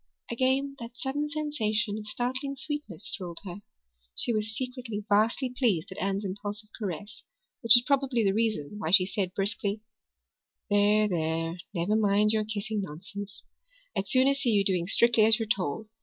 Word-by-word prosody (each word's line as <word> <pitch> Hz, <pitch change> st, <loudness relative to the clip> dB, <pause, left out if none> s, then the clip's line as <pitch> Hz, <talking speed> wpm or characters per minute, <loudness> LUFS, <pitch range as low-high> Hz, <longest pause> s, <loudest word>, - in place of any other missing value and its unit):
Again 265 Hz, +3 st, 0 dB
that 235 Hz, +1 st, -9 dB
sudden 290 Hz, +2 st, -2 dB
sensation 230 Hz, -9 st, -1 dB
of 210 Hz, -, -9 dB
startling 260 Hz, +5 st, -2 dB
sweetness 230 Hz, -, -5 dB
thrilled 175 Hz, -3 st, -7 dB
her. 185 Hz, +2 st, -7 dB, 0.5 s
She 240 Hz, -, +1 dB
was 215 Hz, 0 st, -2 dB
secretly 250 Hz, -5 st, -5 dB
vastly 225 Hz, +5 st, +2 dB
pleased 215 Hz, -, +1 dB
at -, -, -7 dB
Anne's 195 Hz, +2 st, -1 dB
impulsive 205 Hz, +2 st, -6 dB
caress, 205 Hz, +1 st, -6 dB, 0.4 s
which 230 Hz, -3 st, +7 dB
was 240 Hz, -, +6 dB
probably 270 Hz, -4 st, +1 dB
the 195 Hz, -1 st, +2 dB
reason 210 Hz, -5 st, -1 dB
why 160 Hz, -, -2 dB
she 185 Hz, +1 st, +6 dB
said 185 Hz, -1 st, -3 dB
brusquely: 205 Hz, +1 st, -1 dB, 0.9 s
"There, 205 Hz, +1 st, +4 dB
there, 165 Hz, -1 st, -1 dB, 0.2 s
never 175 Hz, +5 st, +1 dB
mind 210 Hz, 0 st, +3 dB
your 215 Hz, -1 st, 0 dB
kissing 215 Hz, 0 st, -3 dB
nonsense. 200 Hz, +5 st, -8 dB, 0.5 s
I'd 195 Hz, -, -2 dB
sooner 265 Hz, +2 st, +5 dB
see 275 Hz, -3 st, 0 dB
you 205 Hz, -3 st, +3 dB
doing 180 Hz, -3 st, 0 dB
strictly 235 Hz, +2 st, +4 dB
as 220 Hz, 0 st, +6 dB
you're 225 Hz, -2 st, -3 dB
told. 205 Hz, -2 st, -1 dB
215 Hz, 160 wpm, -28 LUFS, 195-240 Hz, 0.9 s, which